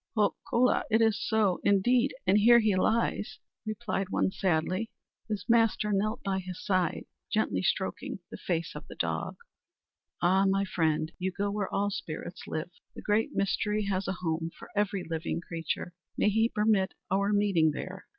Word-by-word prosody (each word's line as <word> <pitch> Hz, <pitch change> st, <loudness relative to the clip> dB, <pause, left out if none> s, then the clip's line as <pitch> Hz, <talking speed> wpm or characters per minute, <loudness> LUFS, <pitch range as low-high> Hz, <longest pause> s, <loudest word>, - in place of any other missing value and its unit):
"Ho, 205 Hz, -2 st, +3 dB, 0.2 s
kola, 250 Hz, +1 st, +3 dB
it 220 Hz, 0 st, +4 dB
is 225 Hz, -2 st, +4 dB
so, 215 Hz, -5 st, +2 dB
indeed; 240 Hz, +7 st, +3 dB
and 195 Hz, +3 st, +4 dB
here 235 Hz, +3 st, +7 dB
he 215 Hz, -4 st, +3 dB
lies," 215 Hz, +1 st, 0 dB, 0.3 s
replied 215 Hz, -3 st, -2 dB
one 190 Hz, -, +1 dB
sadly. 185 Hz, +4 st, 0 dB, 0.4 s
His 205 Hz, -4 st, -3 dB
master 225 Hz, -2 st, +3 dB
knelt 215 Hz, +3 st, 0 dB
by 190 Hz, -1 st, 0 dB
his 185 Hz, -1 st, -7 dB
side, 185 Hz, -4 st, 0 dB, 0.3 s
gently 100 Hz, -, +1 dB
stroking -, -, -1 dB
the -, -, -6 dB
face 170 Hz, -1 st, -2 dB
of -, -, -9 dB
the -, -, -10 dB
dog. -, -, -2 dB, 0.8 s
"Ah, 190 Hz, +3 st, +3 dB
my 195 Hz, +1 st, +2 dB
friend; 160 Hz, -3 st, 0 dB
you 185 Hz, +1 st, -1 dB
go 200 Hz, +2 st, -2 dB
where 200 Hz, -2 st, -2 dB
all 205 Hz, +1 st, 0 dB
spirits 170 Hz, -1 st, -6 dB
live! 155 Hz, +3 st, -4 dB, 0.2 s
The -, -, -9 dB
Great 215 Hz, +2 st, +1 dB
Mystery 210 Hz, +2 st, 0 dB
has 190 Hz, 0 st, -1 dB
a 190 Hz, -, 0 dB
home 165 Hz, 0 st, -1 dB
for -, -, -12 dB
every 200 Hz, -2 st, 0 dB
living 165 Hz, +1 st, -2 dB
creature. 165 Hz, 0 st, -4 dB, 0.2 s
May -, -, +3 dB
he 225 Hz, +2 st, +2 dB
permit 210 Hz, -4 st, +1 dB, 0.2 s
our 200 Hz, +1 st, +2 dB
meeting 200 Hz, -6 st, +3 dB
there!" 185 Hz, +5 st, -6 dB
195 Hz, 170 wpm, -29 LUFS, 180-215 Hz, 0.8 s, here